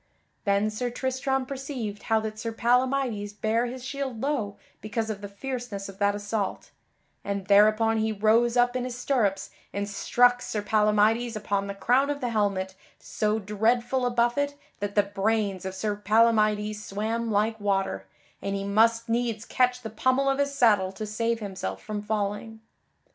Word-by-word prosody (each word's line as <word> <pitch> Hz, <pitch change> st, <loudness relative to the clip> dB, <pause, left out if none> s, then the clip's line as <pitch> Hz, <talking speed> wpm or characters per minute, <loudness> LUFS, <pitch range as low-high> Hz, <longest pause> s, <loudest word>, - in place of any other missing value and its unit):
Then 200 Hz, +1 st, +2 dB
Sir 245 Hz, +3 st, -2 dB
Tristram 260 Hz, +1 st, -1 dB
perceived 260 Hz, -6 st, -5 dB
how 225 Hz, -1 st, +2 dB
that 215 Hz, 0 st, -5 dB
Sir 230 Hz, 0 st, -3 dB
Palamydes 245 Hz, -3 st, +1 dB
bare 225 Hz, +3 st, +1 dB
his 250 Hz, +1 st, -7 dB
shield 270 Hz, -3 st, -4 dB
low 230 Hz, -7 st, -2 dB, 0.2 s
because 220 Hz, +1 st, -2 dB
of 205 Hz, -1 st, -6 dB
the 205 Hz, -, -5 dB
fierceness 235 Hz, -1 st, -5 dB
of 195 Hz, -, -12 dB
that 200 Hz, 0 st, +2 dB
assault, 205 Hz, -1 st, -3 dB, 0.5 s
and 200 Hz, -1 st, -3 dB
thereupon 215 Hz, +3 st, +4 dB
he 220 Hz, 0 st, +1 dB
rose 225 Hz, +3 st, +3 dB
up 245 Hz, +1 st, +3 dB
in 250 Hz, -, -1 dB
his 250 Hz, -1 st, -5 dB
stirrups 220 Hz, -7 st, 0 dB, 0.2 s
and 200 Hz, 0 st, -3 dB
struck 245 Hz, +4 st, +3 dB
Sir 210 Hz, -2 st, -3 dB
Palamydes 215 Hz, +2 st, +2 dB
upon 200 Hz, -1 st, -1 dB
the 200 Hz, -, -5 dB
crown 255 Hz, +7 st, +2 dB
of 290 Hz, 0 st, -2 dB
the 250 Hz, -3 st, -2 dB
helmet 200 Hz, -4 st, 0 dB, 0.2 s
so 215 Hz, 0 st, -1 dB
dreadful 230 Hz, +5 st, +1 dB
a 245 Hz, -, +2 dB
buffet 240 Hz, +4 st, +1 dB, 0.2 s
that 205 Hz, 0 st, -4 dB
the 205 Hz, -, +5 dB
brains 200 Hz, -1 st, -1 dB
of 190 Hz, 0 st, -4 dB
Sir 205 Hz, +2 st, -1 dB
Palamydes 215 Hz, 0 st, +2 dB
swam 225 Hz, +4 st, -2 dB
like 220 Hz, +1 st, +1 dB
water, 195 Hz, -, -1 dB, 0.3 s
and 195 Hz, 0 st, -2 dB
he 195 Hz, -, -3 dB
must 230 Hz, +3 st, +3 dB
needs 230 Hz, -1 st, -1 dB
catch 250 Hz, 0 st, +1 dB
the 220 Hz, -, -5 dB
pommel 260 Hz, +5 st, +1 dB
of 270 Hz, 0 st, +1 dB
his 280 Hz, 0 st, 0 dB
saddle 210 Hz, -8 st, +4 dB
to 215 Hz, +3 st, -5 dB
save 230 Hz, +2 st, -1 dB
himself 195 Hz, -2 st, -4 dB
from 210 Hz, -1 st, -5 dB
falling. 210 Hz, +1 st, -3 dB
220 Hz, 170 wpm, -26 LUFS, 205-245 Hz, 0.5 s, the